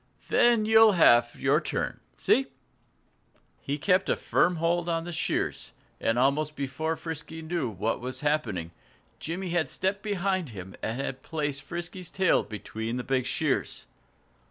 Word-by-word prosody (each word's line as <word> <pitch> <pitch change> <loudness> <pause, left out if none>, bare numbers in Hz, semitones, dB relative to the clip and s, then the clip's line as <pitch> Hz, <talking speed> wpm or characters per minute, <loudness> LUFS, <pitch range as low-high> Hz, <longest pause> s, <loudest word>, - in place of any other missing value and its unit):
Then 235 -3 +4
you'll 220 -1 +7
have 120 -9 +5
your 140 +4 +3
turn - - -3 0.2
see?" 270 0 +3 1.1
He 140 +1 -2
kept 185 +4 +2
a - - +3
firm 180 - +2
hold 170 +1 0
on 165 -1 0
the 175 - -6
shears. 160 - -2 0.3
And 115 - +1
almost 145 +4 +2
before 140 +4 -2
Frisky 160 0 -6
knew 160 -5 -2
what 110 +3 -2
was 125 +1 -4
happening 115 - -1 0.5
Jimmy 180 +3 -4
had 170 -2 0
stepped 195 +1 -1
behind 190 -5 -1
him 95 -4 -9
and 115 +4 -3
had 135 -1 -4
placed 145 -3 -3
Frisky's 175 +4 -6
tail 185 0 +3
between 110 +2 -5
the 125 - -3
big 130 -1 0
shears. - - -1
155 Hz, 150 wpm, -28 LUFS, 130-175 Hz, 1.1 s, you'll